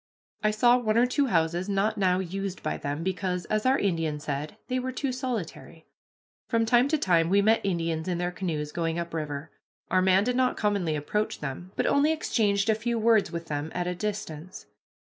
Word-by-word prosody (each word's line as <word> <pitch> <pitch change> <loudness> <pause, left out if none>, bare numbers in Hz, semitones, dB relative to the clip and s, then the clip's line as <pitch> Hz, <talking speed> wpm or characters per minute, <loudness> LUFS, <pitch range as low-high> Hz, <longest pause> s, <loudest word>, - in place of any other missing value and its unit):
I 215 - +4
saw 240 +3 +4
one 220 -2 +1
or 240 - +5
two 275 +3 +1
houses 170 0 +1
not 200 +2 +1
now 185 -3 +2
used 190 +1 -4
by - - -1
them, 145 +3 -4
because, 185 -1 -2
as 215 +3 +1
our 265 +1 +4
Indian 165 -6 -1
said, 145 0 -4
they 255 0 0
were 255 +1 -3
too 260 +1 -2
solitary. 235 - -5 0.6
From 230 -1 +2
time 240 +3 +4
to 310 +2 +1
time 170 - +2
we 200 +2 +4
met 220 +2 +4
Indians 165 -3 -1
in 180 -2 -1
their 175 0 -1
canoes 160 -5 -3
going 165 0 -2
up 170 -1 -4
river. 150 -1 -4 0.4
Our 185 +1 +4
man 190 +1 +4
did 250 +2 0
not 255 0 +2
commonly 200 -7 0
approach 210 +9 -2
them, 150 +6 -6
but - - 0
only 290 +2 +3
exchanged 210 -10 +1
a 220 - +5
few 230 +2 -2
words 220 -5 +3
with 170 -1 -5
them 150 0 -4
at 175 0 -1
a 180 - -1
distance. 185 -4 -5
190 Hz, 205 wpm, -27 LUFS, 165-225 Hz, 0.6 s, or